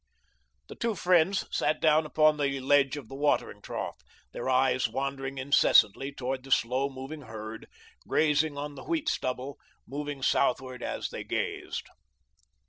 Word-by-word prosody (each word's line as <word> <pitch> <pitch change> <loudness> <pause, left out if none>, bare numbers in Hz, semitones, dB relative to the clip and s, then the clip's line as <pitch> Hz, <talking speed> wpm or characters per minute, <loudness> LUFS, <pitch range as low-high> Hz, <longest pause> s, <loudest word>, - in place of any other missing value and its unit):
The - - -8
two 230 -2 -2
friends 180 +1 +3
sat 155 - +1
down 155 0 +4
upon 155 0 +4
the 140 -2 0
ledge 140 +1 +3
of 135 -6 -8
the - - -11
watering 145 +2 0
trough, - - -5 0.3
their 120 - -4
eyes 130 -1 +3
wandering 135 +2 -3
incessantly 135 -1 +4
toward 130 -1 -4
the 135 - -12
slow 130 +2 +2
moving 135 +3 -8
herd, 110 -2 -8 0.4
grazing 150 -1 +2
on 145 0 -4
the 140 - -10
wheat 325 -2 -1
stubble, 130 +2 -3 0.3
moving 145 -1 -5
southward 130 0 +1
as - - -3
they - - -6
grazed. - - -3
140 Hz, 145 wpm, -29 LUFS, 130-150 Hz, 0.4 s, down